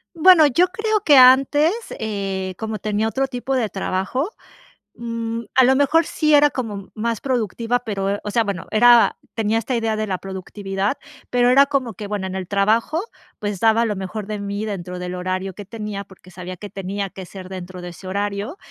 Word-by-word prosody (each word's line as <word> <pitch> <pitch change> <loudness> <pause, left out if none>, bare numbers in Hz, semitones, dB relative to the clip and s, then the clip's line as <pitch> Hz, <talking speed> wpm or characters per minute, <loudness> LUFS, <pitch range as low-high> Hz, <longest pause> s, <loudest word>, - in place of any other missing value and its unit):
Bueno, 330 -2 +7
yo 340 +7 +3
creo 430 +3 -1
que 290 -4 +6
antes, 275 +6 +6 0.3
eh, 195 -3 -3
como 220 -1 -4
tenía 215 +2 -1
otro 270 +4 -1
tipo 255 +1 -4
de 235 -5 0
trabajo, 200 - -2 0.7
mm, 230 -1 -4
a 260 - +7
lo 265 +1 +4
mejor 285 +4 +3
sí 305 0 +1
era 295 0 +6
como 215 -8 -5
más 230 0 -2
productiva, 240 -1 -1
pero, 200 -5 -3
eh, 200 - -2
o 210 - -4
sea, 230 +2 +2
bueno, 200 -5 -4
era 240 +2 +6 0.2
tenía 225 0 0
esta 230 +3 -2
idea 225 -2 0
de 215 0 -2
la 190 -2 -1
productividad, 195 +3 -3 0.3
pero 245 0 +3
era 275 +2 +6
como 270 -5 -1
que, 210 - -6
bueno, 200 -2 -3
en 190 - -6
el 190 -2 -4
trabajo, 220 - +1 0.4
pues, 205 -2 -3
daba 225 +2 +4
lo 210 -2 -1
mejor 190 +2 -5
de 215 -1 -4
mí 200 +1 -4
dentro 180 -4 -5
del 180 0 -5
horario 185 +1 -3
que 205 +2 -9
tenía 210 -1 -6
porque 185 -1 -17
sabía 180 0 -7
que 205 +3 -9
tenía 195 +1 -4
que 190 0 -9
ser 185 0 -10
dentro 185 -1 -8
de 175 - -6
ese 175 +2 -11
horario 205 - -3
215 Hz, 200 wpm, -21 LUFS, 195-245 Hz, 0.7 s, Bueno